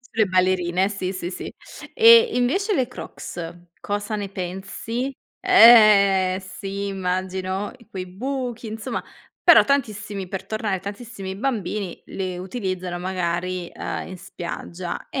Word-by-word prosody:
Sulle 225 -3 0
ballerine, 185 0 +2
sì, 195 -2 -3
sì, 180 -2 -4
sì. - - -7 0.4
E 465 0 +8
invece 380 - +1
le 260 -7 +1
Crocs 175 -8 -7 0.3
cosa 205 +1 -3
ne 205 -1 -4
pensi? 195 +7 -4 0.3
Eh, 210 - +7
sì, 195 +1 -5
immagino 190 +1 -2 0.2
quei 185 -1 -5
buchi, 245 +4 -4
insomma 220 0 -4 0.4
però - - +8
tantissimi 215 -8 -1
per 190 +1 -6
tornare 210 -3 -2
tantissimi 200 -1 -7
bambini 205 -5 -3
le 185 -2 -4
utilizzano 185 -2 -4
magari, 180 -1 -2
uhm, - - -4
in 185 - -8
spiaggia, 175 0 -6
e - - -2
195 Hz, 120 wpm, -23 LUFS, 185-225 Hz, 0.4 s, E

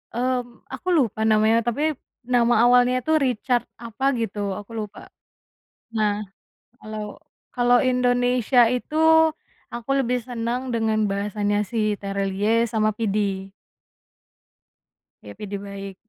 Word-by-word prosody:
Mmm, 245 0 -2
aku 365 - -8
lupa 235 - +1
namanya 220 +1 +4
tapi, 295 +7 +1 0.3
nama 240 -1 +2
awalnya 250 +1 +4
tuh 315 - +3
Richard 245 -1 0 0.2
apa 235 +2 -5
gitu 215 -2 -3 0.2
aku 205 +2 -12
lupa. 210 -2 -8 0.9
Nah, 210 -1 +2 0.7
kalau 215 -2 -6 0.5
kalau 245 0 +4
Indonesia 245 -1 +3
itu, 250 +5 -3 0.8
aku 235 +1 -7
lebih 250 0 0
senang 245 +1 -4
dengan 220 -2 +1
bahasanya 205 +1 -1
si 235 - -4 0.2
Tere 200 0 -2
Liye 215 +4 +1
sama 215 -1 +1
Pidi. 200 -3 -2 1.7
Iya - - -10
Pidi 205 -1 -5
Baiq, 200 -1 -8
230 Hz, 115 wpm, -23 LUFS, 210-245 Hz, 1.7 s, namanya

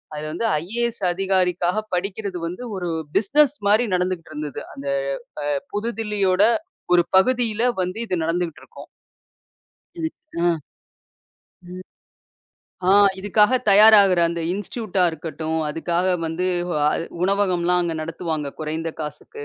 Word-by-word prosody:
அது 150 - -5
வந்து 175 +9 -3 0.2
ஐஏஎஸ் 235 +4 -2
அதிகாரிக்காகப் 185 +2 0
படிக்கிறது 190 +1 -3
வந்து 180 +8 -7
ஒரு 180 -2 -3 0.3
பிசினஸ் 285 +7 +3
மாரி 215 +4 +4
நடந்துகிட்ருந்தது, 165 -6 -3
அந்த 140 +1 -8 0.6
அ - - -3 0.3
புதுதில்லியோட 205 -3 0 0.5
ஒரு 175 -1 +5
பகுதியில 230 +1 +2 0.2
வந்து 185 +3 -3
இது 185 - -1
நடந்துகிட்ருக்கும். 165 -1 -4 1.1
இது 320 -1 -2 0.3
அ. 170 -2 +2 1.1
ம். 185 +1 -9 1.1
ஆ - - +6 0.3
இதுக்காக 210 +5 +3
தயாராகுற 200 -3 +7
அந்த 170 0 -3
இன்ஸ்ட்யூட்டா 200 -1 -2
இருக்கட்டும், 160 0 -4
அதுக்காக 170 +3 -1 0.2
வந்து 165 +3 -2 0.2
வ - - -2 0.5
உணவகம்லாம் 180 -2 +2
அங்க 170 -1 -2
நடத்துவாங்க, 160 -2 -4
குறைந்த 160 +2 -3
காசுக்கு. 155 - -7
185 Hz, 110 wpm, -22 LUFS, 165-210 Hz, 1.1 s, தயாராகுற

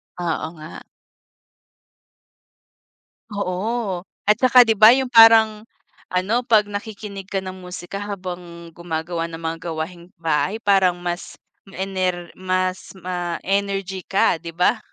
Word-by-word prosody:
Oo 170 -3 -2
nga. 155 +1 -10 2.5
Oo. 200 +1 -2 0.3
At 210 0 +5
saka 255 -1 +7
'di 225 -2 +1
ba 220 +3 +9
yung 260 -2 -2
parang 225 -2 +6 0.4
ano, 190 +6 0
'pag 220 -2 +5
nakikinig 205 -1 -7
ka 195 -1 -3
ng 185 0 -7
musika 180 +1 -7
habang 180 -4 -7
gumagawa 165 0 -4
ng 165 -1 -8
mga 165 0 -3
gawaing-bahay 170 +2 -3
parang 190 -3 +4
mas 175 0 -5 0.3
ma-ener 185 -2 -3
mas 185 0 -2
ma-energy 190 +2 -2
ka, 190 -3 +2
'di 165 0 -9
ba? 180 +6 +2
185 Hz, 115 wpm, -21 LUFS, 175-205 Hz, 2.5 s, ba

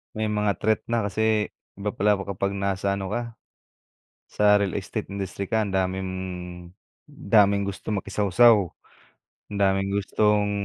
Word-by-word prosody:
May 110 0 -1
mga 105 -1 +2
threat 110 0 +2
na 115 -1 0
kasi 110 +1 0 0.3
iba 100 +1 -2
pala 105 +1 +3
kapag 100 0 -3
nasa 100 0 -1
ano 100 -1 -4
ka 120 0 -4 1.1
sa 105 0 +6
real 100 -3 -1
estate - - -4
industry 100 0 -4
ka. 110 +2 +1
Ang 100 - -4
daming 95 0 -1 1.0
daming 100 -1 +3
gustong 100 +1 -4
makisawsaw, 105 +1 +4 0.9
ang 100 - -3
daming 95 0 +2
gustong 105 +1 +1
100 Hz, 135 wpm, -25 LUFS, 100-105 Hz, 1.1 s, sa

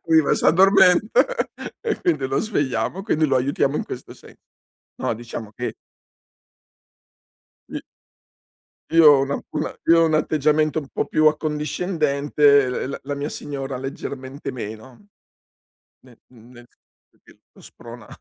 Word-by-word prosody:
prima 160 -2 +3
s'addormenta, 190 +3 +4 0.6
e 450 -2 -3
quindi 150 -6 0
lo 135 +1 -1
svegliamo, 145 - -2
quindi 160 -7 +1
lo 135 -3 +2
aiutiamo 140 +2 0
in - - -2
questo 125 - -8
se - - -17 0.6
no, - - -2
diciamo 115 -2 -8
che 125 - -4 2.0
I - - -3 1.1
io 165 -1 +6
ho 135 - +4
una 140 +1 -2
una 155 +1 -3
io 165 0 +5
ho - - +5
un 160 - 0
atteggiamento 155 0 +1
un 140 - -12
po' - - -3
più 155 - +2
accondiscendente, 150 -2 +1 0.2
l - - -6
la 140 - -5
la 145 +1 -3
mia 140 +1 -4
signora 135 -3 -6
leggermente 135 +1 -6
meno. 120 - -9 1.0
Ne 125 -3 -19
nel 120 +1 -16
senso - - -41
che - - -21
lo - - -20
sprona 120 -1 -13
145 Hz, 135 wpm, -22 LUFS, 130-155 Hz, 2.0 s, io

